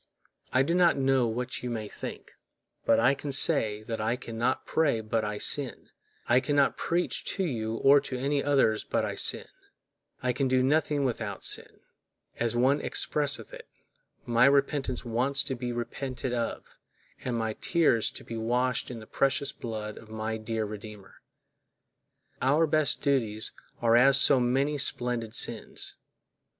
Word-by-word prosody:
I 130 - +3
do 165 - -1
not 175 -3 +4
know 135 -2 +2
what 120 +2 -4
you 125 - -4
may 110 -3 -4
think, - - -8 0.6
but - - +5
I 125 +4 +4
can 140 +1 -5
say 110 -7 +2
that 110 0 -4
I 110 +3 0
can 120 -2 -9
not 115 +2 -1
pray 145 -8 +1
but 110 0 -1
I 105 0 -3
sin—I 125 -1 -1
can 145 +2 -2
not 140 -1 +3
preach 175 +1 -1
to 195 - -1
you 115 -9 -2
or 140 +4 +5
to 135 -2 -5
any 140 +2 0
others 135 -7 +2
but - - -1
I - - -3
sin—I 125 -1 -2
can 135 +2 0
do 130 0 +2
nothing 145 0 +1
without 110 -5 -3
sin; - - -1 0.6
as 120 0 0
one 130 +4 +3
expresseth 145 -2 -1
it, - - -10 0.6
my 120 +1 +4
repentance 140 -2 +1
wants 125 +4 +1
to - - -3
be 120 0 -4
repented 125 +2 -4
of, 120 -1 -4 0.4
and 120 -2 -2
my 110 -1 -1
tears 150 -6 +2
to - - -9
be 115 - -7
washed 125 +2 0
in 120 -3 -7
the - - -11
precious 135 +3 0
blood 110 -4 -6
of 110 - -15
my 110 0 -3
dear 110 0 -3
Redeemer.Our 105 +7 -6
best 155 -1 +1
duties 115 -7 +1 0.3
are 115 0 +4
as 135 +3 +6
so 140 -2 +6
many 135 +4 +1
splendid 120 -4 0
sins. - - -1
125 Hz, 160 wpm, -28 LUFS, 115-140 Hz, 0.6 s, as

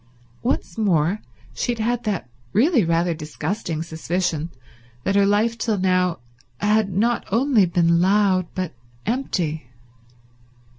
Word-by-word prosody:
Once 170 - -2
more 180 -1 +2 0.3
she 240 - -1
had 235 +2 -1
that 200 - -2 0.3
really 255 - +4
rather 170 +1 +1
disgusting 160 +2 -4
suspicion 165 0 -2 0.5
that 195 - 0
her 200 0 +5
life 220 +3 +2
till 220 -2 0
now 185 -2 +2 0.4
had 210 0 +2
not 230 +6 +1
only 230 -3 +4
been 170 -1 +3
loud 190 -1 +3
but 185 -3 -3 0.3
empty. 175 - -2
190 Hz, 115 wpm, -22 LUFS, 170-220 Hz, 0.5 s, her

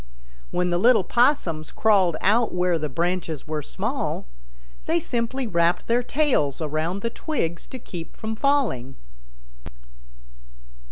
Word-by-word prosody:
When 180 0 0
the 175 - +1
little 235 -1 +5
Possums 180 - +1
crawled 190 -7 +3
out 225 +4 +3
where 180 -2 +1
the 150 -1 -2
branches 170 -1 -2
were 155 -1 -2
small, 140 - -3 0.6
they 170 - +2
simply 240 +6 -2
wrapped 170 -4 +1
their 235 +1 +2
tails 250 - +1
around 160 +5 -2
the 230 - -1
twigs 170 - -3
to 260 - -7
keep 175 -8 -8
from 220 0 -4
falling. 230 - +1
180 Hz, 125 wpm, -24 LUFS, 165-235 Hz, 0.6 s, little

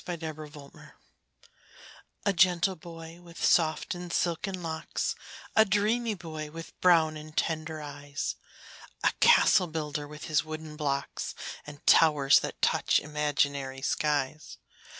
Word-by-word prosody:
THE 175 -1 -4
CASTLE 155 -2 -6
BUILDER 145 -1 -14 1.3
A 200 - +3
gentle 180 +1 +3
boy, 165 0 -11
with 170 -1 -5
soft 160 -2 +2
and 175 -1 -7
silken 180 +2 -1
locks 160 -1 -3 0.4
A 220 - +7
dreamy 215 +3 +1
boy, 155 -4 -7
with 165 +2 -9
brown 165 -3 +4
and 155 0 -11
tender 155 -1 -2
eyes, 145 0 -5 0.7
A - - +4
castle 205 - +6
builder, 150 -2 -4
with 150 +1 -10
his 155 -2 +1
wooden 155 -1 -7
blocks, 140 -3 -3 0.3
And 145 -1 -11
towers 150 -4 +6
that - - -7
touch - - +3
imaginary 145 -3 -1
skies. 150 0 -1
155 Hz, 130 wpm, -29 LUFS, 150-170 Hz, 1.3 s, A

